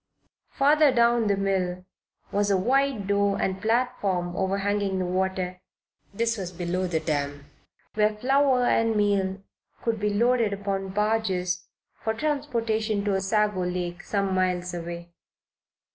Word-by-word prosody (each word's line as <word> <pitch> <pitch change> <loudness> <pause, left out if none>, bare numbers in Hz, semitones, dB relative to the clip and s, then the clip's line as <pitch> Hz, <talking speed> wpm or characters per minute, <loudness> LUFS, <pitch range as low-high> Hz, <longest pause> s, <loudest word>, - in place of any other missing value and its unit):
Farther 295 +1 +4
down 235 -2 +3
the 200 -1 +2
mill 185 -2 -1 0.5
was 205 0 +1
a 195 - +3
wide 260 +1 +1
door 200 0 +1
and 190 0 -1
platform 215 -6 0
overhanging 195 +1 0
the 185 - -1
water 185 0 -2 0.5
(this 230 +2 -1
was 180 -2 -4
below 180 +1 -2
the 165 -2 0
dam) 145 -2 -2 0.5
where 215 0 +2
flour 265 +2 +3
and 225 -2 +2
meal 195 -2 +1 0.4
could 230 -2 0
be 210 0 0
loaded 230 0 +2
upon 195 -1 -3
barges 190 -3 0 0.4
for 220 0 0
transportation 230 -7 -1
to 205 - +1
Osago 205 0 +1
Lake, 180 0 -3
some 195 -2 -1
miles 180 -1 0
away. 170 0 -6
200 Hz, 130 wpm, -26 LUFS, 185-225 Hz, 0.5 s, Farther